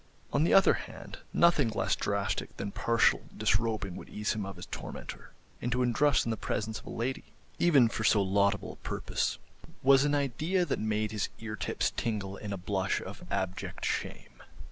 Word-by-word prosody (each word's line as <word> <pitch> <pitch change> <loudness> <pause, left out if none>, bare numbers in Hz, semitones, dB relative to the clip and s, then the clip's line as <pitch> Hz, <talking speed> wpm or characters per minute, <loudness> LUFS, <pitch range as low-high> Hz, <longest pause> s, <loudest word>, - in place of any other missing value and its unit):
On 145 - +3
the 165 - +2
other 195 - +7
hand, - - -8
nothing 170 -8 +4
less 110 - 0
drastic 100 -1 -2
than 100 0 -4
partial 115 +2 +3 0.2
disrobing 105 -3 0
would - - -9
ease 105 0 -1
him 105 -3 -3
of 100 - -7
his 90 - -8
tormentor, - - -8 0.3
and 120 - -2
to 125 +1 +2
undress 135 +4 +3
in 115 - 0
the 110 - -2
presence 105 +1 -2
of - - -16
a - - -6
lady, 125 +3 -3 0.3
even 145 -9 +6
for 110 0 -3
so 105 -1 +5
laudable 100 +1 +1
a - - -13
purpose, - - -2 0.5
was 135 0 +6
an 145 0 +2
idea 155 +7 +1
that 145 - -1
made 110 0 0
his 105 -2 -1
eartips 105 -2 -2
tingle 100 -4 -2
in 105 0 -6
a 100 - -2
blush 95 +1 -1
of - - -8
abject 95 -2 -3
shame. - - -4
110 Hz, 185 wpm, -30 LUFS, 100-130 Hz, 0.5 s, other